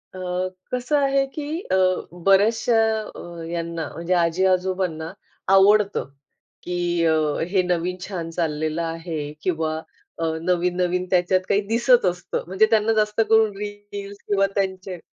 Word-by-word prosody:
अ, - - -7 0.5
कसं 250 +4 +1
आहे 275 -1 +2
की 300 - -4 0.3
अ, - - +4 0.5
बऱ्याचशा 220 +4 +4 0.4
अ, - - -8 0.3
यांना 170 -1 -3
म्हणजे 170 +2 -2
आजी-आजोबांना 180 -1 +1 0.4
आवडतं 200 -4 +4 0.5
की 180 - -4 0.3
अ, 160 -1 +4 0.3
हे 190 -1 +3
नवीन 180 0 0
छान 175 -4 -5
चाललेलं 155 -1 -1
आहे 165 -3 -4
किंवा 160 -3 -1 0.4
अ, - - -2 0.2
नवीन 180 +1 +1
नवीन 180 +1 0
त्याच्यात 185 0 +3
काही 200 +1 +3
दिसत 235 +1 +4
असतं. 180 0 -2
म्हणजे 190 +4 +3
त्यांना 220 0 +3
जास्त 210 0 +1
करून 220 -1 +5
रील्स 205 -1 -7
किंवा 195 -1 +3
त्यांचे 190 -2 -2
185 Hz, 130 wpm, -23 LUFS, 170-205 Hz, 0.5 s, करून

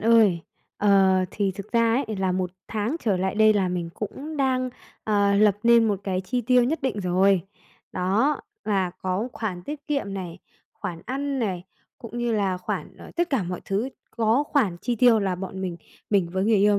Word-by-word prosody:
ơi, 215 -6 +5 0.4
ờ, 195 -2 +4 0.2
thì 200 -2 -1
thực 200 +3 -9
ra 230 +2 +3
ấy, 215 - -4
là 190 -1 0
1 185 -1 -1 0.2
tháng 220 +7 -1
trở 210 -5 +1
lại 190 +2 -1
đây 215 0 +6
là 195 -3 +1
mình 175 -2 -3
cũng 285 +9 -6
đang, 255 -2 +1 0.3
à, 200 -2 +3
lập 210 -2 +5
nên 235 -1 +5
một 200 -2 -1
cái 185 -2 -1
chi 245 +7 -2
tiêu 250 +1 +4
nhất 300 +6 -1
định 250 -6 -1
rồi. 185 +1 +3 0.5
Đó, 205 +11 +1 0.2
là 195 -4 +1
có 185 +5 -3
khoản 190 -7 -4
tiết 290 +8 -7
kiệm 275 -10 -2
này, 180 -2 -6 0.3
khoản 170 -2 -6
ăn 275 +1 -2
này, 190 -7 -2 0.3
cũng 230 0 -7
như 240 -1 0
là 200 -4 +1
khoản 180 0 -5
ở - - -12
tất 345 0 +1
cả 265 -7 +1
mọi 180 0 -4
thứ, 205 +6 -1 0.2
có 230 +4 +2
khoản 265 - +1
chi 240 +3 -1
tiêu 230 -1 +5
là 190 -2 0
bọn 190 +1 -6
mình, 180 -3 -3 0.3
mình 195 -5 +3
với 190 +2 0
người 220 0 +4
yêu 205 +1 +4
205 Hz, 200 wpm, -25 LUFS, 190-235 Hz, 0.5 s, đây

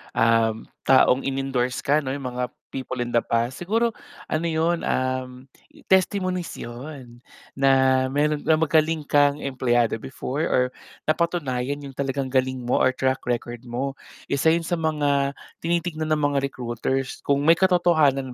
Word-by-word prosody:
um, 115 -1 +2 0.2
taong 130 0 +4
inendorse 135 -2 -1
ka 150 +2 +3
'no, 135 - -5
yung 135 0 -4
mga 125 0 -2 0.2
people 130 -2 -3
in 120 - -6
the 120 - +5
past, 115 +2 -1
siguro 225 +6 +1 0.4
ano 160 +2 0
'yun, 165 +1 +1
um, 130 0 -2 0.5
testimonies 185 -2 +1
'yun, 120 0 -9 0.3
na 130 -1 +3
mayro'n 145 +2 +1
ka 160 - +3
magaling 160 0 +2
kang 145 0 +3
empleyado 120 -4 +1
before 135 +2 -4
or 125 - +3 0.4
napatunayan 145 -5 -1
yung 135 - -9
talagang 135 0 -2
galing 130 -1 0
mo 125 - +1
or - - +5
track 130 0 0
record 120 0 -3
mo. 130 +3 -3 0.3
Isa 140 +3 +2
'yun 165 +1 +1
sa 175 - -2
mga 145 -3 +1 0.3
tinitignan 165 -2 -1
ng 155 - +2 0.2
mga 140 - +2
recruiters 125 +1 -3
kung 140 0 +1
may 165 - +8
katotohanan 160 -8 +3
135 Hz, 145 wpm, -24 LUFS, 130-155 Hz, 0.5 s, may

